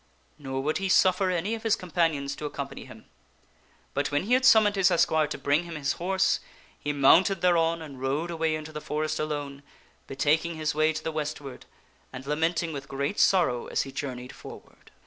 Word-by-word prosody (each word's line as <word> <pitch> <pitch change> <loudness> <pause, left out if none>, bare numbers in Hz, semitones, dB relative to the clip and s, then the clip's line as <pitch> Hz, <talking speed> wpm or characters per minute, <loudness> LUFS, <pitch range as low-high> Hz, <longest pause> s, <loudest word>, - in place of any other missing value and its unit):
Nor 135 -2 -4
would 155 +5 0
he 195 0 -2
suffer 185 +1 +4
any 180 +4 -1
of 225 - -4
his 225 -1 +2
companions 165 -7 -1
to 150 - -7
accompany 140 -1 -7
him; - - -14 0.9
but 145 +1 -1
when 145 +2 +1
he 225 +6 0
had 255 +1 +3
summoned 215 -5 +6
his 195 -1 +4
esquire 160 -3 +2
to 150 - -5
bring 150 +4 +1
him 170 -1 -7
his 145 -2 -1
horse, 190 +2 +1 0.4
he 145 - -2
mounted 170 +7 +4
thereon 165 -2 +2
and 140 -4 -10
rode 145 +6 -1
away 160 -1 0
into 155 0 -7
the 150 -1 -6
forest 155 +1 -2
alone, 145 -2 -4 0.5
be - - -7
Pfiiias. - - -26
taking 160 +4 +1
his 155 -1 -1
way 155 +1 +2
to 155 0 -5
the 160 - -2
westward, 150 -3 -5 0.4
and 130 0 -9
lamenting 160 +3 -1
with 135 -1 -7
great 140 +7 -3
sorrow 170 -11 +3
as - - 0
he 135 - -9
journeyed 130 -2 -6
forward. - - -13
155 Hz, 200 wpm, -27 LUFS, 140-175 Hz, 0.9 s, summoned